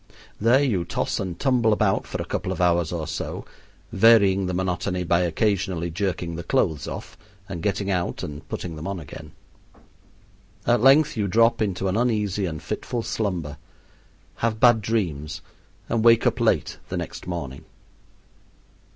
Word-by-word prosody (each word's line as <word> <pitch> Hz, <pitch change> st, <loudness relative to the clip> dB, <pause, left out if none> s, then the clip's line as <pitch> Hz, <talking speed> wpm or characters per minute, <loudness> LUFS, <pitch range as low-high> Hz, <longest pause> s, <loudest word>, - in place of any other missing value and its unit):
There 120 Hz, +6 st, +4 dB
you 105 Hz, -11 st, +1 dB
toss -, -, -2 dB
and 90 Hz, -3 st, -4 dB
tumble 125 Hz, -5 st, +2 dB
about 105 Hz, -2 st, +1 dB
for -, -, -5 dB
a -, -, -3 dB
couple -, -, -3 dB
of -, -, -4 dB
hours 85 Hz, -2 st, +2 dB
or 85 Hz, -3 st, -3 dB
so, 75 Hz, -2 st, -5 dB, 0.5 s
varying 100 Hz, -3 st, +5 dB
the 90 Hz, -, -2 dB
monotony 90 Hz, 0 st, -1 dB
by 85 Hz, 0 st, +2 dB
occasionally 90 Hz, -1 st, 0 dB
jerking 90 Hz, -2 st, -2 dB
the 85 Hz, -, -5 dB
clothes 75 Hz, -3 st, 0 dB
off -, -, -7 dB, 0.3 s
and 85 Hz, -, -6 dB
getting 100 Hz, +1 st, -1 dB
out 90 Hz, -2 st, -2 dB
and 75 Hz, -1 st, -7 dB
putting 85 Hz, -3 st, -5 dB
them 75 Hz, +2 st, -6 dB
on 100 Hz, -2 st, -3 dB
again. 75 Hz, 0 st, -10 dB, 1.3 s
At 120 Hz, -2 st, +3 dB
length 140 Hz, +4 st, +5 dB
you 105 Hz, -2 st, 0 dB
drop 115 Hz, +4 st, +3 dB
into 95 Hz, -2 st, -1 dB
an 95 Hz, +3 st, 0 dB
uneasy 105 Hz, -5 st, 0 dB
and 80 Hz, -3 st, -6 dB
fitful 120 Hz, -2 st, -3 dB
slumber, 90 Hz, -11 st, -3 dB, 0.8 s
have 115 Hz, -1 st, -1 dB
bad 120 Hz, -2 st, +6 dB
dreams, 80 Hz, -9 st, -2 dB, 0.4 s
and 115 Hz, -1 st, 0 dB
wake 115 Hz, 0 st, +6 dB
up 120 Hz, 0 st, +1 dB
late 95 Hz, -10 st, +1 dB
the -, -, -3 dB
next -, -, -6 dB
morning. 70 Hz, -7 st, -5 dB
95 Hz, 160 wpm, -24 LUFS, 85-110 Hz, 1.3 s, bad